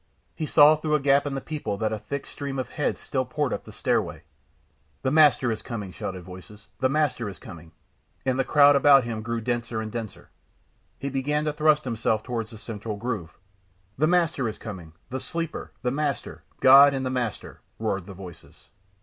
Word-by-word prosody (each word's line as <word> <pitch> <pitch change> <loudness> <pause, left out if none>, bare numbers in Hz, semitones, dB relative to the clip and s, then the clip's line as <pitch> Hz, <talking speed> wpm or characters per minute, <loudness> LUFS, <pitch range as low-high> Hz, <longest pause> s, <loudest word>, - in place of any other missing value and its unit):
He 155 - -4
saw 150 +1 +7
through 155 0 0
a - - +2
gap 140 +1 +3
in 140 - -3
the 135 - -3
people 145 -10 -4
that 110 +1 -1
a 110 - -3
thick 135 +7 -5
stream 140 -1 -6
of 130 - -4
heads - - -1
still - - -2
poured - - -2
up - - -5
the - - -11
stairway. - - -1 0.8
"The 130 - +1
Master 150 -5 +5
is 110 - -4
coming," 105 -6 -6
shouted 95 0 -6
voices, 100 +4 -12
"the 130 - +2
Master 135 -6 0
is 95 - -10
coming," 80 -1 -12 0.5
and 130 0 0
the - - +3
crowd 145 +1 +6
about 140 -1 +6
him 115 -2 -4
grew 115 +1 -3
denser 120 -1 -2
and 110 -1 -5
denser. 115 -2 -7 0.7
He 140 +1 -4
began 145 +3 -1
to 150 - 0
thrust 155 0 +3
himself 110 -3 -1
towards 115 -3 -4
the 115 - -11
central 105 -1 -6
groove. 105 -8 -4 0.6
"The 155 +3 +2
Master 165 -8 +2
is 110 - -7
coming!" 90 -7 -9 0.2
"The 130 - -2
Sleeper, 165 +2 -5
the 125 - +1
Master!" 145 0 -3 0.2
"God 140 +1 +8
and 135 -1 -2
the 130 - -1
Master!" 125 -5 -4 0.2
roared 100 -4 -2
the 100 - -9
voices. 90 -2 -13
125 Hz, 195 wpm, -25 LUFS, 110-145 Hz, 0.8 s, God